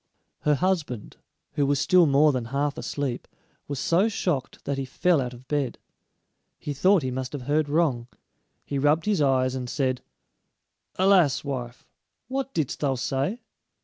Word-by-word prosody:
Her 150 -1 +2
husband, 160 - -2 0.3
who 145 -1 0
was 140 -1 +2
still 180 -1 +5
more 145 +2 +5
than 125 -4 -2
half 140 +4 -1
asleep, 140 -4 -4 0.4
was 145 - -4
so 180 - +2
shocked 170 - -2
that 140 -1 -2
he - - -1
fell 150 +4 +1
out 125 -1 -3
of 125 +1 -14
bed. 145 -4 -1 0.8
He 145 - -5
thought 185 +4 +3
he 130 - -2
must 130 +1 -4
have 140 -3 -5
heard 145 +2 +1
wrong. 145 -7 +1 0.6
He 140 - -2
rubbed 150 +3 +2
his 205 -6 +1
eyes 130 -2 +2
and 125 -2 -4
said: 130 -1 -1 0.9
"Alas, 180 -9 +4
wife, 125 -4 -5 0.4
what 270 0 -2
didst 155 - -2
thou 135 -3 +1
say?" 135 - -2
145 Hz, 160 wpm, -26 LUFS, 130-160 Hz, 0.9 s, still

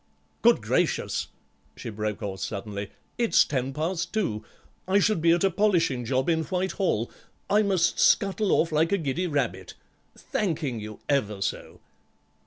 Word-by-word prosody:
Good - - +4
gracious," - - 0 0.5
she - - -7
broke 105 0 -3
off 95 -2 -4
suddenly, 100 -1 -5 0.3
"it's 235 -2 +4
ten 130 -1 -2
past 165 +5 -2
two; 115 - -1 0.4
I 190 +1 +3
should 205 -3 +2
be 165 +1 +5
at 170 +2 +2
a 195 - +3
polishing 165 - +1
job 130 +2 0
in 165 -1 +2
Whitehall. 180 - -1 0.4
I 210 +1 +5
must 195 -4 +1
scuttle 200 0 +3
off 165 - +2
like 155 +3 +2
a 200 - +3
giddy 165 +2 -1
rabbit. 115 - -2 0.4
Thanking 150 - -2
you 110 0 -8
ever 105 -8 0
so." - - -5
155 Hz, 150 wpm, -26 LUFS, 110-185 Hz, 0.5 s, be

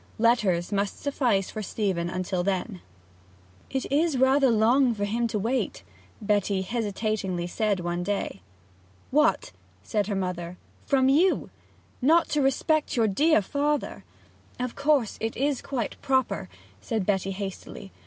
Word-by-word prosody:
Letters 215 -7 +2
must 200 -1 -1
suffice 245 -9 0
for 215 - -5
Stephen 185 -3 -2
till 180 0 -1
then. 190 +1 -2 0.9
'It 265 0 -2
is 305 0 +2
rather 265 +1 +4
long 235 +3 +3
for 205 -1 -1
him 235 +3 0
to 220 - -2
wait,' 235 +6 -1 0.4
Betty 205 -2 0
hesitatingly 205 -4 -2
said 200 +1 -1
one 175 0 -2
day. 195 - -3 0.7
'What!' 300 +4 +2 0.3
said 210 -3 -1
her 205 - -1
mother. 180 -2 -3 0.3
'From 265 -1 +3
you? 325 +8 +3 0.5
not 325 +6 +4
to 295 0 +1
respect 300 +3 +1
your 230 - +4
dear 250 +3 +3
father 290 - -1 0.3
' 95 +1 -30
'Of 250 -1 -2
course 280 -6 +1
it 225 0 -3
is 275 +1 0
quite 245 -6 -4
proper,' 260 - 0 0.3
said 220 - -2
Betty 195 -1 0
hastily. 195 0 -7
220 Hz, 140 wpm, -26 LUFS, 190-265 Hz, 0.9 s, rather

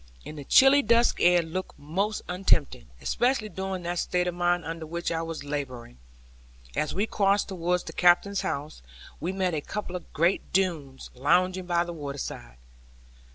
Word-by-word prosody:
In 155 - -8
the 145 - -6
chilly 270 - +6
dusk 235 -1 +3
air, 175 0 +5
it - - -8
looked 185 +3 -5
most 195 +9 -2
untempting, 180 - +1 0.2
especially 240 - +1
during 190 0 -4
that 175 0 -2
state 180 0 0
of 180 - -1
mind 175 -1 0
under 165 0 -5
which 170 +2 -3
I 165 0 -1
was 165 -2 -5
labouring. 130 - -5 0.8
As 155 - -1
we 200 +3 +1
crossed 200 -2 +1
towards 180 -1 -1
the - - -8
Captain's 180 +3 +3
house, 145 - -4 0.4
we 170 +4 -2
met 190 -2 -1
a 150 - -1
couple 195 +2 -5
of 180 - -8
great 170 +5 +1
Doones 160 -8 -1
lounging 180 +7 +1
by 170 -1 +2
the 175 0 -6
waterside. 140 - -6
175 Hz, 170 wpm, -27 LUFS, 155-190 Hz, 0.8 s, chilly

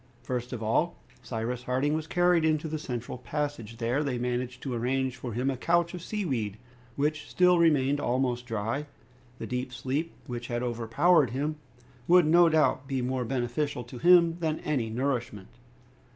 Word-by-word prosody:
First 125 -1 -3
of 120 -3 -5
all, 135 +10 +1 0.2
Cyrus 115 +1 -3
Harding 130 +4 0
was 155 0 -2
carried 175 -1 +3
into 155 0 +1
the 155 0 -3
central 125 -3 -5
passage. 125 -4 -4
There 120 +5 0
they 135 -4 -1
managed 125 +1 -3
to 130 - -3
arrange 130 +2 -1
for 125 -4 -6
him 125 +4 0
a - - -3
couch 170 +6 +1
of 180 - -6
sea 210 +3 -3
weed 110 - -2 0.4
which 150 +1 -1
still 180 -1 +4
remained 145 -4 +3
almost 125 -1 -1
dry. 115 +6 -2 0.5
The - - -5
deep 125 +1 -3
sleep 130 +7 -2
which 120 -1 -5
had 120 0 -2
overpowered 125 +6 +3
him 145 +6 -2 0.5
would 180 -1 +6
no 170 +2 +6
doubt 150 -4 +2
be 130 -2 -1
more 125 0 -1
beneficial 125 +2 -2
to 120 +1 -10
him 170 0 +6
than 160 -2 -1
any 130 -7 -1
nourishment. 120 -4 -2
130 Hz, 170 wpm, -28 LUFS, 120-155 Hz, 0.5 s, would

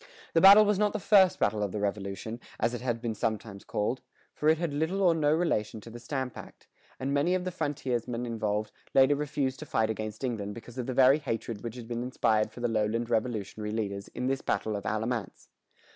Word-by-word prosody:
The 165 - +4
battle 200 +2 +9
was 205 -1 +2
not 210 -1 +2
the 215 - -2
first 195 -2 +5
battle 105 -2 +1
of 100 -2 -1
the 105 - -3
Revolution, 100 +2 -3 0.2
as 120 - +1
it 120 - -4
has 120 -2 -1
been 115 -1 -3
sometimes 110 -2 -3
called, 110 +5 -2 0.3
for 150 - +1
it 160 - +4
had 165 -3 -2
little 160 +7 0
or 175 -2 +5
no 150 -2 +2
relation 150 -10 0
to 115 - -11
the 120 - -9
stamp 130 0 -4
act; - - -12 0.3
and 135 +2 -2
many 150 +6 +2
of 185 - -1
the 185 - -2
frontiersmen 125 -7 -2
involved, 110 -2 -2 0.2
later 135 +2 +6
refused 140 -2 -2
to 155 - -8
fight 110 -3 +1
against 110 +2 -5
England 105 -5 -3
because 120 +2 -10
of 125 - -3
the 130 - -2
very 135 +3 +6
hatred 115 -5 -4
which 115 0 -5
had 120 -2 -8
been 120 0 -3
inspired 110 -4 +1
for 120 - -10
the 120 - +1
lowland 115 +1 -1
Revolutionary 110 -2 -2
leaders 100 -2 -3
in 125 - -2
this 135 +1 0
battle 110 -1 -1
of 100 - -3
the 100 - -3
Alamance. 110 -1 -3
120 Hz, 220 wpm, -29 LUFS, 110-145 Hz, 0.3 s, battle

